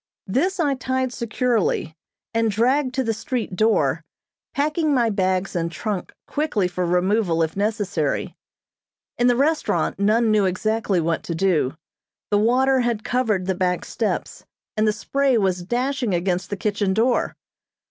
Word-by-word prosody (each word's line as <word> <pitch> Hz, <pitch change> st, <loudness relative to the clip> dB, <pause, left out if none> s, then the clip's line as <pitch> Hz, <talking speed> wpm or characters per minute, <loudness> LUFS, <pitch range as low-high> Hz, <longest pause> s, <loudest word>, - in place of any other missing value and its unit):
This 355 Hz, -, 0 dB
I 290 Hz, -4 st, +2 dB
tied 260 Hz, -1 st, -2 dB
securely, 235 Hz, -8 st, 0 dB, 0.4 s
and 225 Hz, 0 st, +2 dB
dragged 255 Hz, +5 st, +1 dB
to 265 Hz, -, +1 dB
the 225 Hz, -2 st, 0 dB
street 225 Hz, -3 st, -3 dB
door, 170 Hz, -8 st, +2 dB, 0.5 s
packing 300 Hz, +1 st, +1 dB
my 235 Hz, -3 st, +2 dB
bags 190 Hz, -1 st, 0 dB
and 170 Hz, -1 st, -1 dB
trunk 190 Hz, +3 st, -4 dB
quickly 285 Hz, -11 st, 0 dB
for 180 Hz, 0 st, -2 dB
removal 180 Hz, -1 st, +2 dB
if 160 Hz, 0 st, -3 dB
necessary. 200 Hz, -7 st, -1 dB, 0.8 s
In 245 Hz, -, +4 dB
the 245 Hz, -, +4 dB
restaurant 275 Hz, -, +1 dB
none 220 Hz, +3 st, +3 dB
knew 210 Hz, -2 st, +3 dB
exactly 205 Hz, +1 st, 0 dB
what 165 Hz, 0 st, 0 dB
to 170 Hz, -, -3 dB
do. 160 Hz, -6 st, +1 dB, 0.5 s
The 205 Hz, -, +4 dB
water 260 Hz, +4 st, +3 dB
had 235 Hz, -3 st, 0 dB
covered 225 Hz, -7 st, 0 dB
the 190 Hz, -, +1 dB
back 180 Hz, 0 st, -1 dB
steps, -, -, -3 dB, 0.3 s
and 215 Hz, 0 st, +2 dB
the -, -, +4 dB
spray 275 Hz, +3 st, +1 dB
was 190 Hz, -4 st, +1 dB
dashing 245 Hz, +1 st, -1 dB
against 180 Hz, +1 st, -1 dB
the 205 Hz, -, -3 dB
kitchen 200 Hz, -1 st, 0 dB
door. 240 Hz, +3 st, +1 dB
215 Hz, 150 wpm, -22 LUFS, 185-250 Hz, 0.8 s, In